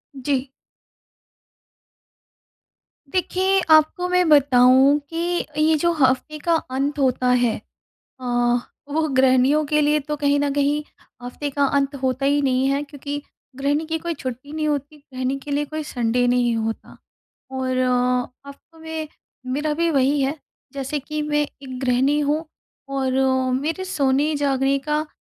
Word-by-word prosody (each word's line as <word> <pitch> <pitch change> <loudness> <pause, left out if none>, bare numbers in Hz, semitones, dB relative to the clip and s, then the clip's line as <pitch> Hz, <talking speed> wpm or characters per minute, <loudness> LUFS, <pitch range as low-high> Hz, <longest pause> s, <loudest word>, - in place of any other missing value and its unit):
जी। 270 0 -2 2.6
देखिए, 375 +1 +1
आपको 315 +3 +4
मैं 360 -1 +3
बताऊँ 270 0 +5
कि 345 +1 -1 0.2
ये 315 +1 +4
जो 340 +3 +2
हफ्ते 270 +1 +1
का 335 +2 +1
अंत 280 0 -2
होता 255 -1 +1
है 245 -2 +2 0.7
अ, - - -9 0.7
वो 310 +2 0
गृहिणियों 260 +3 +4
के 300 +1 +1
लिए 300 +1 +3
तो 300 +1 -4
कहीं 285 0 +2
न 285 -1 0
कहीं 290 +1 +1 0.4
हफ्ते 250 +4 -5
का 280 0 +1
अंत 280 0 0
होता 260 +1 0
ही 285 +1 +3
नहीं 260 -1 +1
है 275 +1 +1
क्योंकि 285 0 -6 0.3
गृहिणी 285 +4 0
की 320 +1 -2
कोई 340 +1 -3
छुट्टी 260 0 -7
नहीं 310 -1 -1
होती, 290 0 -3 0.2
गृहिणी 255 +1 -2
के 285 +2 -8
लिए 290 +1 0
कोई 310 +1 -5
संडे 245 -3 0
नहीं 245 -1 +2
होता। 225 0 -4 0.5
और 260 -1 -2
अ, 250 +1 0
हफ्तों 300 +4 -15
में 320 -1 -5 0.4
मेरा 295 +4 -1
भी 335 +2 +1
वही 280 0 +2
है, 280 +3 -1 0.3
जैसे 275 +2 -3
कि 300 +2 -4
मैं 295 0 0 0.2
एक 260 -2 -7
गृहिणी 260 +3 +2
हूँ 300 +3 0 0.4
और 270 -1 -1 0.5
मेरे 325 +6 -3
सोने-जागने 275 -3 +1
का 300 +1 0
285 Hz, 145 wpm, -22 LUFS, 260-305 Hz, 2.6 s, बताऊँ